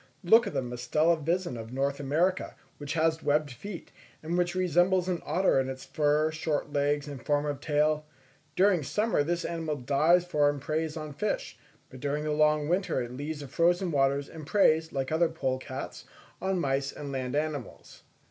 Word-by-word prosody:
Look 225 +7 +6
at - - -5
the - - 0
Mustela 125 +7 +1
vison 170 -6 -1
of 115 +1 -8
North 140 +2 -1
America, 165 +7 0 0.2
which 145 0 -4
has 160 0 +1
webbed 150 0 +1
feet, 175 - -8 0.3
and 165 +2 -2
which 175 0 0
resembles 180 +1 +2
an 180 -2 -1
otter 185 -6 +2
in 130 0 -1
its 130 0 -7
fur, 150 +1 +1
short 155 -2 -2
legs, 145 0 +1
and 140 -4 -8
form 145 0 +1
of 145 -2 -3
tail; 150 0 +1 0.5
during 190 -3 +4
summer 180 - 0
this 170 +4 -1
animal 160 -2 -2
dives 150 +7 +3
for 150 -4 +3
and 145 0 -2
preys 155 +2 -2
on 155 -2 -6
fish, 210 +9 -2 0.4
but 130 - -10
during 145 +2 -2
the 155 - -1
long 150 0 +3
winter 180 -3 0
it 120 -1 -4
leaves 145 +2 -5
the 140 - -7
frozen 175 +5 +2
waters, 140 -1 +1
and 155 -3 -10
preys, 160 -4 +3
like 135 0 -2
other 160 +1 +3
polecats 130 -3 -4 0.4
on 190 0 0
mice 135 -2 0
and 145 -1 -7
land 130 -1 -3
animals. 150 -4 -4
150 Hz, 185 wpm, -29 LUFS, 140-170 Hz, 0.5 s, Look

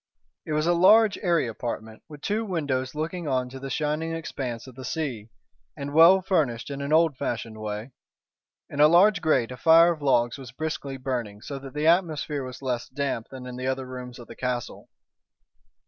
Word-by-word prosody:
It 155 - -2
was 155 +1 +1
a 175 - +3
large, 205 +5 +5
airy 170 -6 +2
apartment, 110 -1 -6
with 150 -2 -11
two 215 +2 0
windows 145 -9 -2
looking 165 +2 -3
on 130 -2 0
to 135 +1 -9
the 135 +1 -6
shining 155 +4 -1
expanse 125 -7 -5
of 130 - -12
the 130 +2 -10
sea, 125 -6 -4 0.5
and 140 0 -5
well 170 +4 +7
furnished 145 -10 0
in 140 0 -5
an 140 +1 -3
old 160 -2 +4
fashioned 115 -3 -4
way. 105 +4 -5 0.8
In 140 - -7
a 150 - +8
large 190 +6 +5
grate 130 -7 +2
a 125 - -7
fire 165 +3 +6
of 155 - -13
logs 120 -2 +2
was 130 -3 -9
briskly 140 -1 -4
burning, 120 -6 -4
so 140 -1 -6
that 135 +1 -11
the 150 +1 -1
atmosphere 160 -4 +1
was 130 +1 -9
less 125 -2 -2
damp 135 -4 -3
than 130 -1 -9
in 125 0 -7
the 130 +1 -3
other 130 0 -2
rooms 125 -1 -8
of 120 - -11
the - - -11
castle. 125 -2 -4
140 Hz, 195 wpm, -26 LUFS, 125-160 Hz, 0.8 s, a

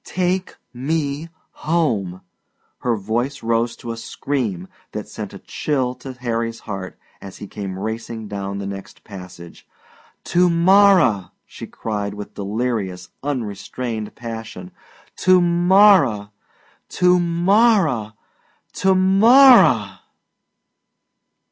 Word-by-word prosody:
Take 185 +1 -2 0.2
me 145 +3 -3 0.2
home" 110 - -1 0.6
her 120 -2 0
voice 115 +7 -3
rose 115 +1 0
to 115 - -7
a 115 - -6
scream 115 -7 -4 0.3
that - - -5
sent - - -7
a - - -10
chill 130 -4 -2
to 130 +1 -10
Harry's 115 -2 -3
heart 95 -3 -7 0.2
as 100 -1 -10
he - - -8
came 95 -2 -7
racing 110 +1 -5
down 100 -1 -5
the 100 - -5
next 100 0 -9
passage 90 -4 -12 0.6
"to 180 +1 +2
morrow!" 170 - +4
she - - -10
cried 105 -2 -4
with 105 0 -9
delirious, 100 -4 -3
unstrained 115 -3 -5
passion 115 -6 -8 0.5
"To 185 0 +4
morrow! 175 - +4 0.6
To 180 0 +3
morrow! 175 - +2 0.6
To 190 0 +2
morrow!" 190 - +5
120 Hz, 105 wpm, -20 LUFS, 105-170 Hz, 0.6 s, morrow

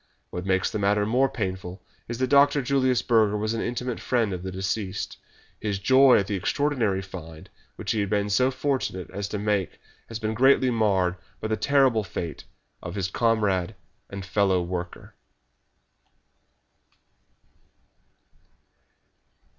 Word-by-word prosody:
What 90 +2 -5
makes 95 -1 +1
the 110 - -3
matter 105 +1 +2
more 130 +5 +2
painful 95 -6 -5 0.2
is 120 - -4
that 130 - +1
Dr. 140 0 +5
Julius 130 -2 +1
Burger 110 -3 +3
was 110 +1 -1
an 115 - -2
intimate 125 0 -3
friend 115 -6 0
of 90 - -5
the 95 +1 -5
deceased. 95 +1 -3 0.4
His 105 -2 -2
joy 130 +6 +6
at 100 - +1
the 105 - -4
extraordinary 110 -1 0
find 80 -4 -10 0.2
which - - -3
he 110 - 0
has 100 -1 -1
been 105 0 0
so 125 +6 +3
fortunate 130 -9 -2
as 100 +1 -4
to 105 - -4
make 105 -3 -1 0.3
has 115 - -5
been 110 -1 -2
greatly 130 +2 +4
marred 95 -5 +1 0.2
by 110 - -4
the 110 - +1
terrible 130 -1 +3
fate 85 -5 -6 0.4
of 85 0 -7
his 95 -2 -2
comrade 105 -4 +1 0.3
and 100 -1 -7
fellow 95 -1 +2
worker." 90 0 -6
105 Hz, 145 wpm, -25 LUFS, 95-125 Hz, 0.4 s, joy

